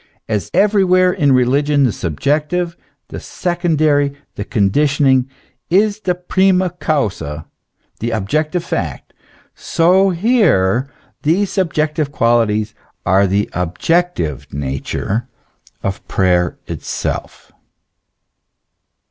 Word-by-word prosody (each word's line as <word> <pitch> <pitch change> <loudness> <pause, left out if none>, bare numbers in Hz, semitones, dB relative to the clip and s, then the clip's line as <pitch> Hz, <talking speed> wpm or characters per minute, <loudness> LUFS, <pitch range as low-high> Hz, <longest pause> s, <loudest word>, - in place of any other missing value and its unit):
As 105 -5 -2
everywhere 185 -3 +3
in 150 -7 +2
religion 140 +3 +3
the 125 - +3
subjective, 150 - -1 0.3
the - - -6
secondary, 155 -5 0 0.2
the 100 - -5
con 100 -3 +1
ditionating, 135 -1 +2 0.4
is 205 +4 +2
theprima 180 -1 +1
causa, 90 - -2 0.5
the 115 - -2
objective 155 - -1
fact; 80 - -4 0.4
so 185 +4 +2
here, 165 - +2 0.3
these 180 +6 +1
subjective 155 -5 -1
qualities 115 -4 +1 0.3
are 95 +2 +3
the 100 +2 0
objective 90 - -1
nature 70 - -3 0.6
of 95 0 -4
prayer 90 -3 +1
itself. - - -5
145 Hz, 90 wpm, -17 LUFS, -, 0.6 s, everywhere